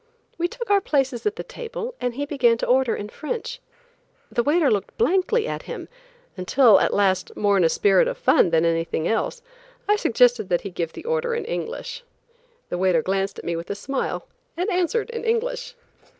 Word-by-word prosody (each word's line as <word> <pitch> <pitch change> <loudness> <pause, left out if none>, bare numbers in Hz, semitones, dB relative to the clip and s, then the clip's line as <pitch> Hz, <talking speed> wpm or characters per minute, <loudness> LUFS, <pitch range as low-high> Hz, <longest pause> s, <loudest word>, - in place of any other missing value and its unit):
We 345 - +2
took 475 +2 -6
our 400 -1 +5
places 270 - 0
at 420 - -1
the - - -5
table - - -6
and 245 -1 -1
he 285 +2 -2
began 245 -5 +2
to - - -2
order 255 -1 +2
in 205 - -6
French. 470 - -5 0.7
The 240 - +1
waiter 295 +3 +3
looked 205 -3 -2
blankly 380 - +2
at - - -4
him - - -6 0.5
until, 205 +4 +5
at - - +1
last, 195 -2 +1
more 205 -1 +2
in 190 - +3
a 165 - +4
spirit 195 +2 +3
of - - -3
fun - - +4
than 165 0 +2
anything 165 0 0
else, 475 - -1 0.4
I 415 +1 +4
suggested 245 - +3
that 175 - +1
he 200 - -6
give 170 -2 -3
the - - -10
order 480 0 0
in 460 -3 -3
English. - - -5 0.7
The 175 - -3
waiter 180 -4 +3
glanced 195 +1 -1
at - - -9
me 170 - -1
with 165 +1 -6
a - - -2
smile 270 +6 -3 0.3
and 365 +5 -1
answered 405 +6 0
in 465 - -5
English. 485 +2 -1
265 Hz, 195 wpm, -23 LUFS, -, 0.7 s, our